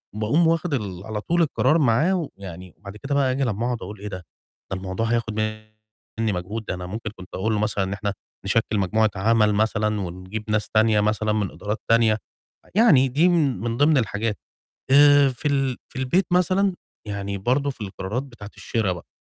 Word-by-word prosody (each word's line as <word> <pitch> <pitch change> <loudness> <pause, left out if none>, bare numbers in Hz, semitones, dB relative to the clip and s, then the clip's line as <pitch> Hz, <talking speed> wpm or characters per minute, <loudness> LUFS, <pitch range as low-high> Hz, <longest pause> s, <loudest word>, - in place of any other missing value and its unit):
باقوم 135 +11 +2
واخِد 165 0 0
ال 100 -7 -3
على 110 -1 -4
طول 170 +8 +1
القرار 160 0 +2
معاه 155 +6 +2
ويعني 90 -2 -9
وبعد 100 +1 -10
كده 140 +4 -3
بقى 135 -2 +2
آجي 135 +2 0
لمّا 115 -2 -1
أقعُد 125 -2 -2
أقول 100 +2 -8
إيه 105 - -6
ده، 100 - -5 0.5
ده 95 - -1
الموضوع 95 +4 -3
هياخُد 115 -1 0
منّي 110 0 -5
مجهود، 100 +5 -4
ده - - -3
أنا 90 0 -6
ممكن 110 +4 -5
كنت 95 0 -11
أقول 110 +4 0
له 105 - 0
مثلًا 105 -2 0
إن 95 +1 -3
إحنا 100 0 -3 0.3
نشكِّل 105 +1 +1
مجموعة 110 +3 +2
عَمَل 105 +1 +3
مثلًا 105 0 +1
ونجيب 95 +4 -6
ناس 105 0 0
تانية 110 -1 +3
مثلًا 105 0 0
من 105 -2 -1
إدارات 105 +2 -4
تانية، 115 -2 +4 0.6
يعني 165 - +6
دي 150 +8 +3
من 150 - +2
من 115 0 -2
ضِمن 145 +2 +4
الحاجات. 110 -2 -1 0.5
آآ، 145 0 +7
في 130 +3 -3
ال 135 -3 0
في - - -9
البيت 170 +9 +1
مثلًا 185 +2 +2 0.3
يعني 100 -1 -4
برضه 130 +8 +1
في 130 - -11
القرارات 105 +3 -4
بتاعة 120 -7 -11
الشِرا 110 -5 -1
بقى، 85 -2 -9
110 Hz, 190 wpm, -23 LUFS, 100-135 Hz, 0.6 s, آآ